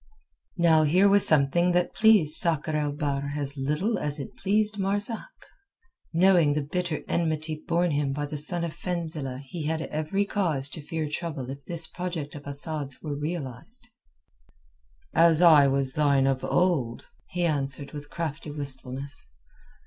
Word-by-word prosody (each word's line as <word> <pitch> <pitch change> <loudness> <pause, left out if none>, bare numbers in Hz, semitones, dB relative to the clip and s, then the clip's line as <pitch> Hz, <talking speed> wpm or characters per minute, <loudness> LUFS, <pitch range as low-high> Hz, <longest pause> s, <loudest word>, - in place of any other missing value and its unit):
Now 165 -2 +5
here 180 +6 +4
was 200 0 +4
something 160 +4 +3
that 180 0 +1
pleased 210 -9 +5
Sakr 160 -3 +2
el 150 -1 0
Bahr 145 -1 -2
as 140 -1 -3
little 150 +11 -1
as 150 0 -2
it 140 - -7
pleased 210 +1 +1
Marzak. 205 - -2 0.8
Knowing 170 -3 +4
the 150 - 0
bitter 175 +2 -3
enmity 155 -2 -1
borne 170 0 +1
him 145 -1 0
by 145 +2 -3
the 145 - -6
son 170 +4 +1
of 165 -2 -3
Fenzileh 155 -7 -4
he 150 +3 -6
had 160 0 -1
every 155 +7 -1
cause 160 -10 0
to 155 - -7
fear 155 +1 -3
trouble 145 -4 -4
if 140 +1 -9
this 170 -1 -1
project 170 -5 -5
of 145 -1 -10
Asad's 145 -1 -3
were 150 -2 -3
realized. 145 -5 -3 1.2
"As 165 0 +5
I 155 -5 +7
was 135 -1 +1
thine 140 -2 +3
of 135 -1 0
old!" 155 -11 0 0.2
he 175 0 -1
answered 140 -3 -1
with 145 -1 -9
crafty 160 -2 -5
wistfulness. 140 -1 -5
155 Hz, 155 wpm, -26 LUFS, 140-175 Hz, 1.2 s, I